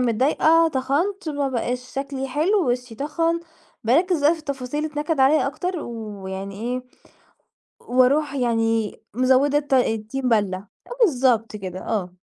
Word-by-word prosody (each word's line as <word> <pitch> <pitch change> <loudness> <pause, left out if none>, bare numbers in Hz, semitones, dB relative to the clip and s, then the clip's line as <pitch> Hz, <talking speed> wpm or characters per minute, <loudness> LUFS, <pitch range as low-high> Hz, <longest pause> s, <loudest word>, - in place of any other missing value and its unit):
متضايقة 295 +7 +3
تَخَنت 315 +8 -1
ما 285 -2 -1
بقاش 250 0 -3
شكلي 270 -1 -3
حلو، 315 +3 +2
وشي 245 -1 -3
تَخَن 330 +6 -1 0.4
بارَكِّز 330 +8 +3
بقى 300 - +6
في 335 - -4
التفاصيل 280 -2 -4
اللي 305 - -5
تنَكِّد 300 0 -1
عليَّ 275 +2 +4
أكتر، 355 +5 -3
ويعني 200 -4 -6
إيه، 250 +2 -3 1.0
وأرُوح 275 +4 +2
يعني 225 -4 0 0.2
مزوِّدة 260 +3 +3
الطَ 285 -2 -1
الطين 245 +1 0
بَلّة، 205 -5 +2 0.3
أه - - -9
بالضبط 245 - +2
كده، 185 -2 -6
آه. 185 -5 -3
260 Hz, 135 wpm, -23 LUFS, 230-300 Hz, 1.0 s, بقى